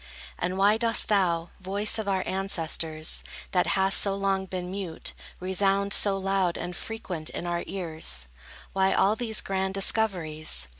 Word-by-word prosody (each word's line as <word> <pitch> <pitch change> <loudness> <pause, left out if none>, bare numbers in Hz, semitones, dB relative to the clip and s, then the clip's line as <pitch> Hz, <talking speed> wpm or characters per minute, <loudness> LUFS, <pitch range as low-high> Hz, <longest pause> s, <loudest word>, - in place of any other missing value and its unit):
And 180 +1 -1
why 205 +2 +5
dost 230 0 +2
thou, 175 -5 +2
voice 200 +4 0
of 215 - -3
our 190 -1 +1
ancestors, 165 -4 0 0.3
That 180 -1 +2
hast 190 0 +3
so 195 -1 0
long 195 -1 0
been 180 -1 -4
mute, 190 -4 -4 0.3
Resound 195 +2 +1
so 200 -1 +5
loud 195 -2 +1
and 175 0 -4
frequent 185 -9 -4
in - - -5
our 175 0 -1
ears? 160 - -3 0.5
Why 190 0 +3
all 205 +2 +4
these 220 -2 -1
grand 190 0 -1
discoveries? 165 - +1
190 Hz, 150 wpm, -27 LUFS, 175-200 Hz, 0.5 s, why